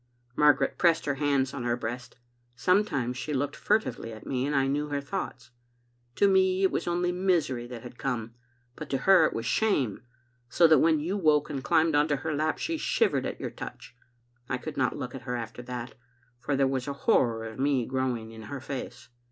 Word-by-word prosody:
Margaret 145 -2 +3
pressed 170 -2 +3
her 145 - +1
hands 140 -1 0
on 140 - -5
her 120 0 0
breast. 120 +1 -6 0.4
Sometimes 145 - +1
she 150 +2 -3
looked 145 +2 -1
furtively 125 - 0
at 110 -1 -10
me, 130 0 -1
and 145 - -1
I 135 -1 +3
knew 145 +2 -1
her 145 -1 -2
thoughts. 140 -4 -5 0.6
To 200 - +4
me 190 0 +3
it 190 - +4
was - - -2
only 175 +1 +1
misery 170 -10 0
that 120 -2 -8
had 125 0 -11
come, 115 -4 -3 0.4
but 155 - -8
to 135 - 0
her 180 +4 +5
it - - -5
was 115 - -4
shame, 145 - +1 0.5
so 170 - +4
that 160 -1 +6
when 160 -1 +4
you 175 +7 -2
woke 155 -5 +2
and 135 -2 -4
climbed 160 +1 +3
into 145 0 +3
her 155 +3 -3
lap 155 +2 0
she 330 0 -2
shivered 455 - +1
at - - -6
your - - -4
touch. 125 - -9 0.5
I 130 - 0
could 150 +4 -7
not 130 -2 0
look 125 -1 -5
at 135 - -7
her 125 +1 -4
after 120 0 -6
that, 120 0 -6 0.5
for 140 +3 -1
there 135 0 +3
was 130 -1 -2
a 140 - -2
horror 115 -3 +3
of 110 +2 -8
me 135 -3 +1
growing 125 -4 -2
in 110 0 -10
her 140 - -5
face. 130 -2 -7
140 Hz, 210 wpm, -28 LUFS, 125-160 Hz, 0.6 s, that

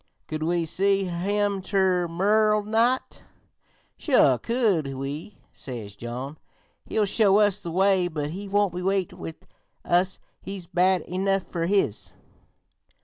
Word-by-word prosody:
Could 155 0 -4
we 170 +1 0
see 195 +4 +1
him 200 +3 -1
ter 185 -2 +1
morrer 210 +5 +2
night?' 230 +4 0 0.8
'Sure - - +4
could 200 - 0
we,' 140 +9 -6 0.2
says 110 -6 -8
John; 125 +7 -6 0.5
'he'll 215 - +1
show 200 0 +3
us 205 -1 +3
the 170 - -5
way, 190 +1 +3
but 150 -3 -4
he 200 +4 -6
won't 200 -2 +1
wait 185 +1 -1
with 160 - -9 0.4
us; 180 +2 +1 0.2
he's 195 -3 -7
bad 180 +1 +2
enough 195 +2 -1
fer 170 -2 -3
his.' 195 - 0
185 Hz, 130 wpm, -25 LUFS, 165-200 Hz, 0.8 s, Sure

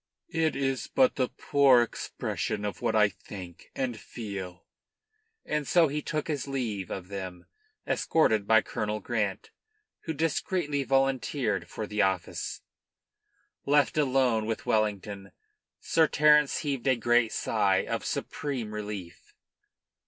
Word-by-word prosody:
"It 160 -1 +1
is 135 -1 -1
but 260 -1 +3
the 130 -2 0
poor 135 -4 +4
expression 105 -2 -4
of 105 - -4
what 115 -2 0
I 105 -1 +6
think 90 -3 -10
and 125 -4 -2
feel." 100 -6 -7 0.8
And 150 -2 -2
so 170 -4 +4
he 150 +2 -2
took 155 0 -3
his 145 -4 -2
leave 115 -9 -3
of 90 -1 -6
them, 95 -3 -6 0.4
escorted 110 -10 +2
by 110 0 +6
Colonel 105 0 -3
Grant, 105 -3 -2 0.5
who 160 - -2
discreetly 155 -1 -1
volunteered 135 -4 0
for 110 - -4
the 105 0 -1
office. 95 -3 -1 1.1
Left 145 -4 +3
alone 130 -6 +2
with 115 - -3
Wellington, 100 -2 -1 0.5
Sir 160 -1 +3
Terence 150 -1 +4
heaved 140 -4 -2
a 130 - +5
great 120 0 +2
sigh - - +1
of - - -2
supreme 125 -7 -3
relief. 105 -5 -7
120 Hz, 130 wpm, -28 LUFS, 105-140 Hz, 1.1 s, I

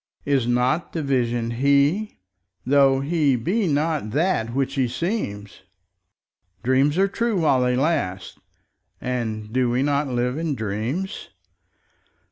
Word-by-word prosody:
Is 135 -4 +1
not 125 +7 0
the 160 - -2
Vision 120 -4 0
He? 140 - +2 0.5
tho' 135 0 +4
He 145 -2 +2
be 185 - 0
not 150 -5 0
that 140 - 0
which 135 +2 -1
He 130 -3 +1
seems? 120 - -4 1.0
Dreams 135 +5 +2
are 195 +1 +4
true 220 0 -1
while 135 -5 +3
they 125 0 +1
last, 125 - -1 0.6
and 110 -4 -4
do 130 -1 +2
we 125 +2 +1
not 145 0 +1
live 125 +2 -1
in 160 -3 -1
dreams? 115 - -4
135 Hz, 125 wpm, -23 LUFS, 120-155 Hz, 1.0 s, tho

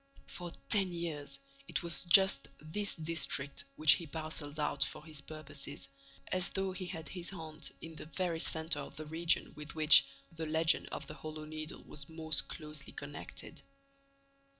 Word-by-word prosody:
For 175 -1 -7 0.2
ten 195 -4 +4
years, 150 -5 -4 0.3
it - - -2
was 170 0 -2
just 190 -4 +7
this 200 +7 -2
district 160 - -1
which 155 -1 +7
he 165 +2 +3
parcelled 155 -1 -5
out 150 -1 +2
for 150 - -5
his 155 -3 -3
purposes, 145 -2 -6 0.4
as 185 0 +4
though 190 -1 -1
he 185 -1 -5
had 165 -3 -6
his 180 -2 -3
haunt 160 -3 -3
in 165 0 -7
the - - -7
very 170 -1 -2
centre 160 -2 +3
of 140 - -7
the 155 - -6
region 165 +2 +2
with 150 +1 -7
which, 155 0 +9 0.3
the 165 -1 -5
legend 160 +1 +4
of - - -5
the - - -7
Hollow 155 0 -7
Needle 155 0 -6
was 140 0 -6
most 160 -2 +2
closely 150 -2 -7
connected. - - -7
160 Hz, 165 wpm, -34 LUFS, 150-170 Hz, 0.4 s, which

